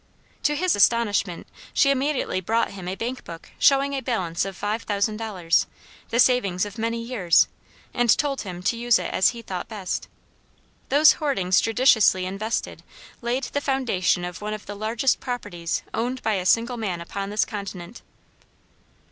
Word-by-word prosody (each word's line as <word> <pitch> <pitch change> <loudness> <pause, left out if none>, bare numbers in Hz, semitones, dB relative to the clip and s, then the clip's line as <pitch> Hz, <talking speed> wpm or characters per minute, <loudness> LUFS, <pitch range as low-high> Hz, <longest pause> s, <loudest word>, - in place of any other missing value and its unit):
To 295 - +1
his 360 +4 +1
astonishment 205 -4 +2 0.3
she 275 - +5
immediately 275 -7 0
brought 225 +5 0
him 190 -3 -8
a 185 - -3
bank 245 +5 -4
book 165 -1 -10
showing 275 0 +4
a 270 - -2
balance 185 -10 -1
of 195 -2 -6
five 210 +2 -2
thousand 210 0 -1
dollars, 190 -7 0 0.4
the 235 - 0
savings 210 -8 +3
of 205 +2 -9
many 230 +1 -1
years, 225 -8 +3 0.5
and 240 -1 +1
told 280 -2 -1
him 180 -3 -7
to 235 - +1
use 240 0 +3
it - - -4
as 190 - +4
he 235 -1 -8
thought 185 -4 -5
best. 205 -5 -4 0.8
Those 295 +3 +7
hoardings 195 - +1
judiciously 225 -5 +4
invested 200 +5 -3 0.4
laid 245 +3 -1
the 285 +3 -2
foundation 230 -11 0
of 180 +2 -7
one 210 +1 -3
of 215 - -11
the 205 - -6
largest 220 +5 0
properties 200 -9 -4
owned 250 +3 -2
by 220 - +1
a 185 -2 -1
single 235 +3 +2
man 195 -6 -3
upon 195 +4 -5
this 210 +1 +1
continent. 200 -2 -7
220 Hz, 165 wpm, -24 LUFS, 190-245 Hz, 0.8 s, Those